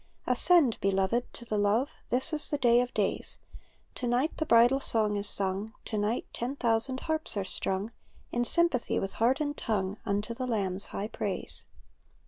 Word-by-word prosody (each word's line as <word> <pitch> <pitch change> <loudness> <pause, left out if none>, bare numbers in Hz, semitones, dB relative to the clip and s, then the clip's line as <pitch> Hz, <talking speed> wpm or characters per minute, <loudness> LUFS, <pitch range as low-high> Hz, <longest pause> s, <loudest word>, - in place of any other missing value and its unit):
Ascend, 265 0 +4
beloved, 195 +5 +1
to 235 - -8
the 215 -2 -1
love; 215 +7 +2 0.2
This 255 +5 0
is 300 - -2
the 290 - 0
day 240 -2 +4
of 250 0 -3
days; - - -2 0.6
To 245 - -4
night 250 +6 +1
the 315 - -2
bridal 240 +2 +5
song 215 -5 0
is 205 0 -2
sung, 200 +3 -2
To - - -4
night 210 +3 0
ten 250 +4 -3
thousand 235 +1 0
harps 315 -7 -2
are 200 - 0
strung. 195 +3 -2 0.4
In 240 - +1
sympathy 340 -2 +3
with 195 - -3
heart 250 +4 +3
and 290 -1 -1
tongue, 200 -5 -2
Unto 205 +3 -1
the 255 +2 -4
Lamb's 200 -4 -1
high 205 - -4
praise. - - -4
235 Hz, 175 wpm, -29 LUFS, 205-260 Hz, 0.6 s, bridal